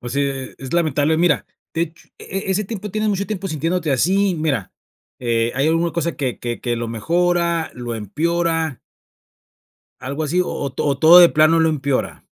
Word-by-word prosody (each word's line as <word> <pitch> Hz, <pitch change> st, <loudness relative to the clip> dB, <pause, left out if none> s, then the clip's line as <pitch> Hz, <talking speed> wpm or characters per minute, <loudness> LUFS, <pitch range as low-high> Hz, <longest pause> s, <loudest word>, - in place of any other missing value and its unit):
Pues, 120 Hz, 0 st, -6 dB
sí, 140 Hz, -, 0 dB
e 135 Hz, -2 st, -2 dB
e -, -, -24 dB
es 135 Hz, -1 st, -8 dB
lamentable, 155 Hz, -2 st, +2 dB
mira, 165 Hz, -3 st, +2 dB, 0.3 s
de 165 Hz, -, -1 dB
hecho 165 Hz, 0 st, -7 dB
e -, -, -11 dB, 0.2 s
e -, -, +1 dB
ese 200 Hz, +3 st, 0 dB
tiempo, 210 Hz, 0 st, -6 dB
¿tienes 215 Hz, +2 st, -1 dB
mucho 200 Hz, 0 st, -1 dB
tiempo 195 Hz, -2 st, -4 dB
sintiéndote 165 Hz, +1 st, -1 dB
así? 190 Hz, +8 st, +2 dB
Mira, 135 Hz, -, -1 dB, 0.5 s
eh, 115 Hz, -1 st, 0 dB
¿hay 135 Hz, +4 st, +1 dB
alguna 165 Hz, +1 st, +1 dB
cosa 170 Hz, 0 st, -2 dB
que 130 Hz, -5 st, -2 dB
que 120 Hz, -1 st, -4 dB
que 120 Hz, -1 st, -2 dB
lo 115 Hz, 0 st, -3 dB
mejora, 170 Hz, +7 st, 0 dB
lo 120 Hz, -1 st, -5 dB
empeora? 160 Hz, -, -1 dB, 1.2 s
Algo 140 Hz, +4 st, -4 dB
así, 170 Hz, +5 st, +1 dB
o 180 Hz, -, -1 dB
o, 140 Hz, -, -3 dB
¿to 140 Hz, +1 st, -1 dB
todo 165 Hz, +4 st, +8 dB
de 175 Hz, -, +8 dB
plano 155 Hz, +1 st, +4 dB
lo 160 Hz, -, +4 dB
empeora? 140 Hz, -3 st, -2 dB
160 Hz, 195 wpm, -20 LUFS, 135-170 Hz, 1.2 s, todo